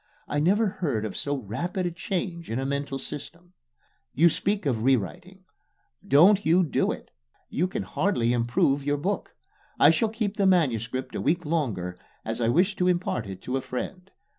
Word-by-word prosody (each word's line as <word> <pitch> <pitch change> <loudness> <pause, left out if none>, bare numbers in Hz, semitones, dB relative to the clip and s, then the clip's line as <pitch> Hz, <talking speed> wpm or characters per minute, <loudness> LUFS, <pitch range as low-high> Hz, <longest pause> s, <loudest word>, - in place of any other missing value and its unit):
I 145 - -1
never 200 +9 +3
heard 145 - -2
of 105 - -5
so 145 0 -1
rapid 155 - -3
a 175 - -1
change 175 -1 -4
in 115 - -2
a 135 - -2
mental 140 0 -2
system. 170 +6 -9 0.6
You 170 +4 +6
speak 200 +3 -1
of 120 -6 0
rewriting. 175 - -1 0.6
Don't 185 +9 +6
you 170 +4 +4
do 160 - +1
it. - - -8 0.4
You 180 - +1
can 190 - -3
hardly 120 - 0
improve 120 +4 +1
your 145 +1 0
book. 190 +8 -3 0.4
I - - +8
shall 225 -3 +1
keep 215 -2 -3
the 195 - +3
MS. 135 - +2 0.2
a - - -3
week 175 +3 +1
longer 105 - -2 0.3
as 115 +2 -3
I 115 - +2
wish 185 - +3
to 180 - +2
impart 175 - 0
it 95 -1 -8
to 130 +1 -1
a - - -2
friend. 180 +10 -6
155 Hz, 180 wpm, -26 LUFS, 125-185 Hz, 0.6 s, I